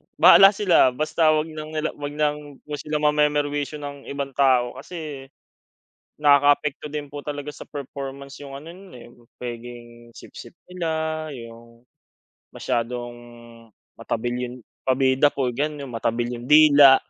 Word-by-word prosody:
bahala 195 +1 +8
sila, 185 -10 +4
basta 155 +1 +2
wag 155 +1 -2
lang 155 0 -8
nila 155 0 -1
wag 145 0 -5
ng 150 -2 -3 0.2
sila 150 0 -3
mame-merwisyo 150 -1 +1
ng 140 -1 -8
ibang 140 -1 -4
tao 130 -3 +3
kasi, 150 -6 -8 0.9
nakaapekto 145 0 +3
din 150 -1 -5
po 145 +1 -8
talaga 145 0 -5
sa - - -11
performance 140 -1 -7
yung 135 -1 -8
ano 155 +4 -12
nun, 190 +1 -14
eh, 120 - -12 0.3
pwedeng 120 -1 -9
sipsip - - -12 0.2
nila, 160 -3 -3
yung 115 -1 -12 0.7
masyadong 120 +1 -3 0.8
matabil 120 +1 -3 0.2
yung 125 - -9 0.3
pabida 130 +2 +3
po 135 -2 -2
ganun. 145 +3 -3
yung 130 - -10
matabil 115 +1 -1
yung 120 - -10
dila, 145 -3 +8
145 Hz, 135 wpm, -23 LUFS, 125-150 Hz, 0.9 s, bahala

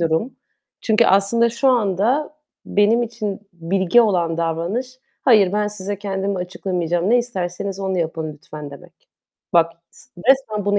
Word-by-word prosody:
durum. 165 +9 0 0.4
Çünkü 220 +1 +3
aslında 215 +5 +3
şu 235 +4 +1
anda 240 +5 +1 0.3
benim 210 +4 +3
için 215 -4 -4
bilge 180 +5 +2
olan 175 -7 +1
davranış, 170 +11 -2 0.2
"Hayır, 210 -7 +5
ben 210 0 +1
size 205 -1 -5
kendimi 195 -1 -2
açıklamayacağım. 180 0 -2
Ne 245 - +5
isterseniz 195 -4 -4
onu 190 -1 -1
yapın 160 -1 -3
lütfen." 150 0 -10
demek. 170 +4 -15 0.4
Bak 165 -1 +4 0.2
s - - -19 0.2
resmen 220 -7 +2
bunu 205 0 +2
195 Hz, 140 wpm, -20 LUFS, 175-220 Hz, 0.4 s, Hayır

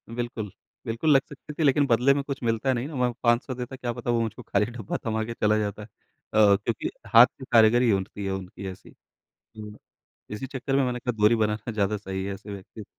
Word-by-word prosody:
बिल्कुल। 120 -4 -4 0.3
बिल्कुल 115 +7 -1
लग 135 - +6
सकती 145 +1 -10
थी 160 - -2
लेकिन 145 0 +4
बदले 125 +3 +4
में 140 0 -1
कुछ 140 0 -5
मिलता 115 +3 +1
नहीं 125 +3 -2
ना 155 - -9
वहाँ 125 -2 0
500 120 +2 +2
देता, 125 +1 -6
क्या 120 -2 -4
पता 120 0 -3
वो 115 -1 +2
मुझको 115 +2 -4
खाली 105 0 +1
डब्बा 115 -4 -4
थमा 110 -1 -1
के 115 - -5
चला 105 -1 +2
जाता। 105 0 -3
अ - - -9 0.5
अ, 105 -2 +6
क्योंकि 105 +2 -3 0.3
हाथ 115 - +11
की 130 - -8
कारीगरी 115 +1 +5
उठती 100 +1 -2
है 95 - -1
उनकी 95 +1 -6
ऐसी। 90 - -14 0.4
तो 105 -1 -12 0.6
इसी 105 - -5
चक्कर 135 +1 -3
में 135 - +3
मैंने 125 -1 -2
कहा 125 0 -2
दूरी 105 +3 +6
बनाना 110 +1 -1
ज़्यादा 105 0 0
सही 95 -2 -5
है 100 - -3
ऐसे 100 +1 -10
व्यक्ति 100 +2 -9
115 Hz, 220 wpm, -26 LUFS, 105-125 Hz, 0.6 s, हाथ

